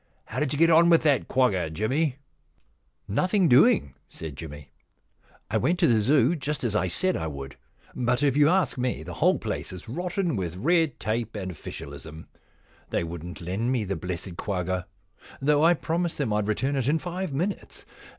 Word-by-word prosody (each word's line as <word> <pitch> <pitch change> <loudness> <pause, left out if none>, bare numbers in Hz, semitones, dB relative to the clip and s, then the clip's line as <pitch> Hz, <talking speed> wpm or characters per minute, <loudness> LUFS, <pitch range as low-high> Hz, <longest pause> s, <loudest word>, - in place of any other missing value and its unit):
How - - -5
did 150 -3 0
you 145 - -1
get 165 +2 +5
on 170 +1 +6
with 165 -2 +5
that 145 -4 +2
quagga, 100 -11 +2
Jimmy? 130 - 0 0.4
' - - -42
* - - -45
Nothing 185 - +2
doing,' 145 - +5 0.2
said 80 -4 -8
Jimmy, 75 0 -9 0.4
* 85 - -27
I 110 - +2
went 150 - +1
to 175 - +3
the 115 -7 +4
Zoo, 135 +6 +3
just 150 -1 -3
as 110 -4 -1
I 95 - +2
said 185 - +1
I 80 - -2
would. 70 -2 -7 0.4
But, 125 +2 0
if 140 -3 +3
you 145 0 +5
ask 185 -6 +1
me, 125 -10 -1
the 90 +2 -7
whole - - +3
place - - -4
is 90 +2 -9
rotten 175 - -2
with 90 -4 -3
red 160 - +1
tape 115 0 -2
and 95 -3 -4
ofHcialism. 80 0 -9 0.6
They - - 0
wouldn't 85 +1 -7
lend 95 +8 -1
me 125 -4 +1
the 95 -1 -2
blessed 90 +1 -5
quagga, 95 -2 -2 0.5
though 145 +2 +3
I 170 +2 +6
promised 170 +2 -2
them 135 -8 -1
I'd 105 -1 0
return 135 +6 0
it 130 -2 0
in 150 +3 +3
five 180 +1 -4
minutes. 175 +9 -4
125 Hz, 195 wpm, -26 LUFS, -, 0.6 s, on